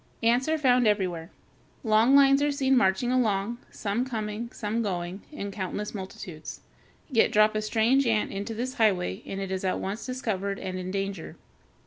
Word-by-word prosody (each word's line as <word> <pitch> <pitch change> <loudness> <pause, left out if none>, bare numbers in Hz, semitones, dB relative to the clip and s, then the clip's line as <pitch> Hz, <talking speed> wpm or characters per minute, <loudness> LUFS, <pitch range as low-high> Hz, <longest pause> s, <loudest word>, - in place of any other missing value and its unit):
Ants 240 +4 +3
are 320 - +2
found 250 -5 +3
everywhere. 180 -6 0 0.5
Long 225 +4 +4
lines 275 0 +6
are 290 0 +2
seen 270 -1 +2
marching 195 +2 +2
along, 230 -2 0
some 210 +4 -2
coming, 225 -2 -4
some 220 +1 -2
going, 180 -2 -3
in 200 -9 -5
countless 205 +1 -4
multitudes. 190 -5 -8 0.5
Yet 225 -4 +4
drop 215 +1 +4
a 215 - -1
strange 230 +5 +2
ant 220 -2 +1
into 200 +3 -4
this 250 +3 -3
highway 205 -5 +1
and 195 - -4
it 195 -1 -4
is 190 0 -2
at 185 - 0
once 200 +4 -4
discovered 205 -6 -3
and 185 -1 -5
in 185 0 -5
danger. 195 -2 -4
215 Hz, 170 wpm, -27 LUFS, 195-245 Hz, 0.5 s, lines